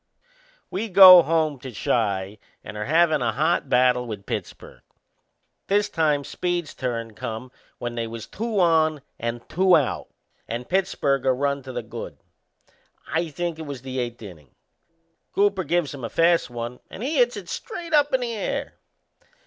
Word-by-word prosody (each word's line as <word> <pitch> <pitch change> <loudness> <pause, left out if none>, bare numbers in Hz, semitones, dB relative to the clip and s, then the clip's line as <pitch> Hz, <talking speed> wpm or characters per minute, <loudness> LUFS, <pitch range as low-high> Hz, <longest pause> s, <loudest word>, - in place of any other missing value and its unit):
We 215 +4 -3
go 185 -2 +10
home 160 -3 0
to 130 0 -8
Chi 100 -3 -1 0.2
and 105 - -9
are 105 - -4
havin' 160 0 +3
a 115 -2 0
hot 155 +1 0
battle 125 -1 +3
with 105 -3 -7
Pittsburgh. - - -6 0.9
This 205 +1 +2
time 150 -5 +1
Speed's 175 0 -3
turn 115 -3 -4
come 115 +4 -6 0.3
when 120 0 -4
they 115 -1 -3
was 115 -1 -7
two 220 -1 -3
on 160 -4 +3 0.2
and 115 +1 -4
two 185 +1 +4
out, 140 -5 -2 0.4
and 120 +2 -5
Pittsburgh 150 -8 0
a - - +6
run 140 +2 -1
to 130 0 -9
the - - -4
good - - -8 0.9
I 165 +1 0
think 170 +1 -4
it 160 - -7
was 135 -3 -7
the 130 -1 -4
eighth 120 -2 -4
innin'. 85 -8 -12 0.9
Cooper 200 -1 +2
gives 170 -2 0
him 135 -3 -9
a 115 - -3
fast 170 +1 +2
one 120 +1 -6
and 210 - -8
he 295 +4 -1
hits 245 -2 +3
it 190 -4 -8
straight 340 - -6
up 290 -1 +4
in 260 - +1
the 235 -1 -2
air. 215 - -4
145 Hz, 170 wpm, -24 LUFS, 120-180 Hz, 0.9 s, go